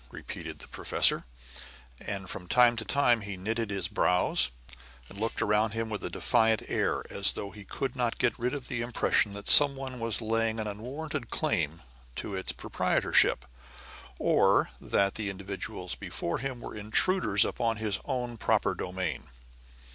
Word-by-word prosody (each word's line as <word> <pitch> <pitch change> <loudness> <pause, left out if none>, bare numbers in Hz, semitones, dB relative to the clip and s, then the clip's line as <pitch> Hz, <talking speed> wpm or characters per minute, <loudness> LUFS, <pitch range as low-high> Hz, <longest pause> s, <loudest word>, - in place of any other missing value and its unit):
repeated - - -7
the - - -9
professor, - - +3 0.7
and 95 -1 -5
from 90 0 -7
time 120 +3 +5
to 115 - -3
time 120 -3 +2
he 100 -1 -6
knitted 110 +3 -2
his 100 -3 -1
brows, 90 -6 +2 0.6
and 100 - -11
looked 115 +1 -1
around 105 0 +2
him 115 0 -3
with 105 - -3
a - - -2
defiant 110 -3 +2
air, - - 0
as - - +3
though 100 - -5
he 105 - -11
could 135 +7 -4
not 120 -3 -1
get - - 0
rid 125 +2 0
of 135 -3 -6
the 125 -4 -2
impression 115 -3 +1
that 100 0 -8
someone 135 -3 +4
was 115 -2 -1
laying 115 0 0
an 110 - -2
unwarranted 125 +6 -5
claim 85 - -1 0.3
to - - -5
its 95 -1 -1
proprietorship, - - +2 0.7
or - - +3
that 100 0 +1
the 105 -2 -3
individuals 95 0 -5
before 85 - -4
him 130 -2 -4
were - - -7
intruders 105 - +2
upon 115 -2 -1
his 110 -2 -2
own 125 -3 -3
proper - - +1
domain. 90 -2 -4
110 Hz, 160 wpm, -29 LUFS, 100-120 Hz, 0.7 s, time